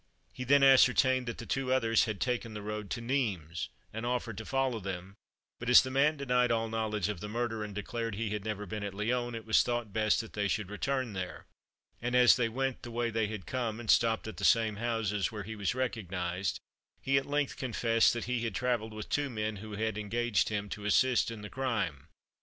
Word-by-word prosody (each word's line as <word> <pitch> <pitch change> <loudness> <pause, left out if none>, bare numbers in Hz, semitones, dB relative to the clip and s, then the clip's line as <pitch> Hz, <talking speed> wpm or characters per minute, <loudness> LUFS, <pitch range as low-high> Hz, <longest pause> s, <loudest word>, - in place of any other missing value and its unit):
He 125 - -5
then 140 +2 +5
ascertained 130 -1 +5
that 115 - -4
the 115 - -7
two 130 +2 -1
others 115 -3 +3
had 110 -3 -4
taken 120 -3 -2
the 105 - -6
road 105 -1 -5
to 120 - -3
Nimes, 100 - -2 0.2
and 110 +1 -4
offered 120 -2 -2
to 110 - -7
follow 135 -3 0
them; 95 -1 -6 0.5
but 120 - -3
as 125 - +9
the 130 - -5
man 145 +3 +3
denied 125 -3 +2
all 115 -1 +1
knowledge 110 -3 -1
of 105 -4 -3
the 105 - -6
murder, 115 -1 -2
and 105 -2 -7
declared 115 +1 -3
he 110 0 -2
had 105 -1 -3
never 105 -1 -3
been 105 +2 -5
at 100 -1 -5
Lyons, 120 +3 -1
it 115 - -7
was 110 - +5
thought 120 -4 -2
best 110 0 +2
that 115 - -11
they 105 -1 0
should 100 -1 -2
return 130 +2 -1
there; 90 -1 -5 0.6
and 125 +1 -1
as 125 -1 +7
they 120 -2 +1
went 135 +2 -2
the 120 - -8
way 120 0 -1
they 110 -1 0
had 105 -4 -6
come, 120 -4 -2
and 115 -3 +1
stopped 115 -1 +3
at 110 - -7
the 100 - -6
same 110 0 +3
houses, 110 -3 -1
where 105 -2 -5
he 110 +3 -6
was 105 +3 -1
recognised, 95 -8 -2 0.4
he 135 0 +2
at 135 - -9
length 145 -1 0
confessed 115 -2 +2
that 120 -2 -3
he 125 -1 -1
had 115 - -2
travelled 120 -4 -1
with 105 -1 -6
two 145 -1 0
men 110 -3 -3
who 105 +2 -8
had 110 0 -2
engaged 110 0 0
him 105 -1 -2
to 105 +1 -7
assist 125 +4 +3
in 110 -2 -7
the - - -5
crime. 110 - -2
115 Hz, 225 wpm, -31 LUFS, 105-125 Hz, 0.6 s, as